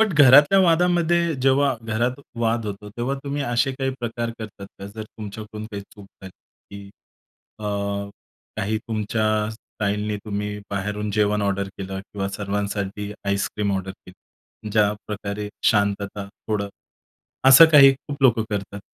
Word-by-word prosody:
But 220 -4 +3
घरातल्या 145 +8 +7
वादामध्ये 170 -1 +3
जेव्हा 135 0 +3
घरात 120 +3 0 0.3
वाद 115 -1 0
होतो, 105 0 -6
तेव्हा 120 +5 -2
तुम्ही 140 0 -2
असे 120 +2 +1
काही 135 0 -2
प्रकार 115 0 -3
करतात 105 -3 -8
का? 100 - -7
जर 105 +2 -7
तुमच्याकडून 110 0 -8
काही 100 -1 -5
चूक 100 -2 -13 0.2
झाली 95 - -8 0.5
की 100 - -11 0.7
अ, 105 - -8 0.9
काही 110 +2 -1
तुमच्या 110 0 -2 0.3
स्टाईलनी, 105 -1 -3
तुम्ही 105 0 -3
बाहेरून 105 +1 -3
जेवण 105 0 +1
ऑर्डर 100 0 -1
केलं 95 0 -5
किंवा 100 0 -5
सर्वांसाठी 100 0 -3
आईसक्रीम 100 +1 -1
ऑर्डर 95 0 -3
केली? 95 +3 -15
ज्याप्रकारे 105 0 -1 0.2
शांतता 100 -1 +1
थोडं, 100 0 -4 0.8
असं 135 +5 +11
काही 135 -2 +9
खूप 140 +1 -8
लोकं 115 -4 +4
करतात. 100 0 -4
105 Hz, 135 wpm, -23 LUFS, 100-120 Hz, 0.9 s, असं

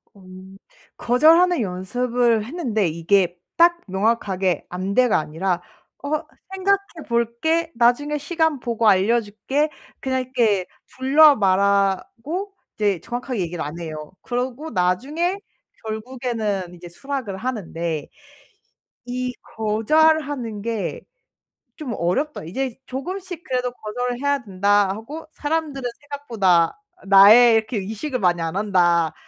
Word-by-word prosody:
음 190 0 -13 0.4
거절하는 325 +7 +4
연습을 230 +4 0
했는데 235 - -1
이게 175 +2 +1 0.2
딱 345 0 +5
명확하게 190 -3 0
"안돼"가 200 +6 +1
아니라 175 +4 -2 0.4
"어 285 - -4 0.4
생각해 395 +1 +1 0.2
볼게. 235 +9 0
나중에 250 +6 +2
시간 320 -1 0
보고 230 -2 0
알려줄게." 220 +8 +2 0.3
그냥 260 -1 -1
이렇게 230 -7 +1 0.3
둘러 285 +3 +6
말하고 200 - 0 0.2
이제 205 -5 0
정확하게 245 +1 -4
얘기를 170 -1 -3
안 150 +4 -6
해요. 155 -2 -7
그러고 255 +5 -3
나중에 270 - 0 0.5
결국에는 220 -5 -3
이제 175 0 -11
수락을 255 -1 -5
하는데. 170 - -4 1.0
'이 250 0 -3 0.2
거절하는 245 +1 +1
게 230 -2 -3 0.8
좀 265 -7 -4
어렵다. 265 - -1
이제 250 +9 -3
조금씩 355 +6 -6
그래도 250 -3 -1
거절을 245 +2 -4
해야 285 0 +1
된다' 200 0 +2
하고 225 +11 -6
'사람들은 290 -4 -2
생각보다 230 - +1 0.3
나에 210 +5 +8
이렇게 220 0 +1
의식을 220 +7 -4
많이 175 -4 +2
안 165 +2 -3
한다' 175 -6 +2
230 Hz, 265 characters per minute, -22 LUFS, 190-275 Hz, 1.0 s, 나에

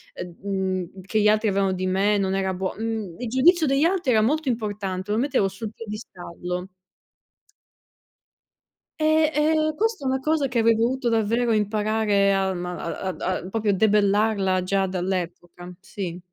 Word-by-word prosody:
ehm, 180 -1 -7
mhmm, 190 -2 -3
che 215 +2 0
gli 210 - +4
altri 215 +1 +2
avevano 195 -1 +1
di 185 0 -2
me, 200 +3 +2
non 190 -1 0
era 190 -1 0
buo 185 +1 -3
mhmm, 220 -6 -4
il 245 -2 -4
giudizio 315 +6 +4
degli 275 +3 +3
altri 340 -7 +1
era 220 -2 +4
molto 290 +4 +1
importante, 205 -4 -3
lo 215 - +1
mettevo 250 -6 +1
sul 210 +3 -6
piedistallo. 180 -4 -7 2.3
Eh, 310 0 +3
ehm, 310 0 +1
questa 430 -6 -1
è - - +1
una 265 0 +1
cosa 305 +1 +1
che 250 -2 -3
avrei 230 0 +4
dovuto 245 +3 0
davvero 230 +1 +1
imparare 210 -1 +1
alm 190 -2 -1
a 175 -1 -5
a 190 -1 -3
da 185 0 -3
proprio 215 +2 -1
a 200 - +4
debellarla 200 -2 +2
già 195 +1 0
dall'epoca, 180 -1 -4
sì. 185 -3 -6
210 Hz, 160 wpm, -24 LUFS, 190-240 Hz, 2.3 s, gli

